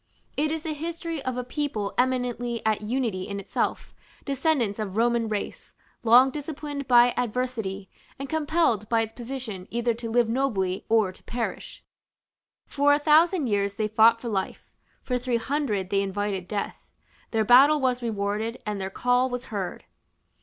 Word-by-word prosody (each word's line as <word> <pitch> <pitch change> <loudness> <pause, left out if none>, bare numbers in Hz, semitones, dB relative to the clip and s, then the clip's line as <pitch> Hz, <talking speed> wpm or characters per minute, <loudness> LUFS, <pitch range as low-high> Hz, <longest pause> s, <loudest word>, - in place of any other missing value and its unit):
It 300 +1 +1
is 320 -1 -3
the 315 - -2
history 330 0 -5
of 255 -1 -3
a 250 - -2
people 245 -6 -3
eminently 245 -2 -1
at 215 -1 +1
unity 215 -4 -2
in 200 -1 -4
itself, 195 - -2 0.3
descendants 275 -7 0
of 205 -2 -4
Roman 235 0 +2
race, 210 -1 -5 0.3
long 245 +3 +6
disciplined 290 -1 -5
by 245 0 +6
adversity, 225 -5 -2 0.3
and 275 - -5
compelled 300 - +1
by 230 -1 +3
its 225 0 -4
position 235 -6 -6
either 235 0 0
to 230 0 -6
live 235 0 +3
nobly 220 -7 -1
or 220 -4 +3
to 185 - -17
perish: 235 -1 -5 0.8
for 290 0 +3
a - - +2
thousand 315 +2 +4
years 200 -3 0
they 215 0 0
fought 225 +2 +5
for 235 - -7
life; 195 -4 -3 0.3
for 250 -1 -1
three 245 -1 0
hundred 230 -7 -2
they 200 -1 +3
invited 200 -1 -2
death: 205 0 -5 0.4
their 220 -1 +1
battle 275 +6 +7
was 255 -2 0
rewarded, 220 +1 -2
and 210 -2 -3
their 190 - -3
call 245 +5 +1
was 245 0 -4
heard. 190 -3 -4
240 Hz, 160 wpm, -26 LUFS, 210-270 Hz, 0.8 s, battle